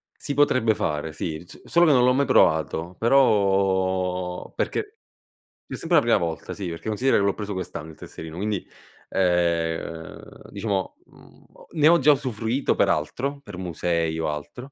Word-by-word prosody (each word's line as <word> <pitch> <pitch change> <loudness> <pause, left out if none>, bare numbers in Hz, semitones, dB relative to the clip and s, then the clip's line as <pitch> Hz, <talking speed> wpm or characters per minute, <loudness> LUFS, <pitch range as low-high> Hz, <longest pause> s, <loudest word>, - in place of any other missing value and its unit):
Si 145 - -4
potrebbe 130 -5 +3
fare, 75 -2 -2
sì, 80 0 -5
so - - -11
solo 170 0 +4
che 155 - +5
non 125 -3 +5
l'ho 125 +1 +4
mai 140 +2 +2
provato, 80 - +2
però 95 -6 +1
perché 420 0 -3 0.7
c'è - - -6
sempre 165 0 +2
una 145 - +3
prima 120 - +4
volta 85 -5 -4
sì, 95 -3 -5
perché 85 +5 -7
considera 125 +5 +2
che 100 - +2
l'ho 100 0 +1
preso 105 -1 -5
quest'anno 90 -4 -6
il - - -15
tesserino, 80 0 -9
quindi, 100 +1 -2 0.4
ehm, 85 -3 -2
diciamo, 100 -2 -3
mhmm, - - -20
ho - - -18
ne 150 -1 +4
ho 170 +1 +6
già 150 +2 +6
usufruito 130 -1 -1
per - - +2
altro, 135 - -2
per 105 -7 -10
musei 85 -2 -1
o 80 - -1
altro, 100 - -7
95 Hz, 170 wpm, -24 LUFS, 85-125 Hz, 0.7 s, ho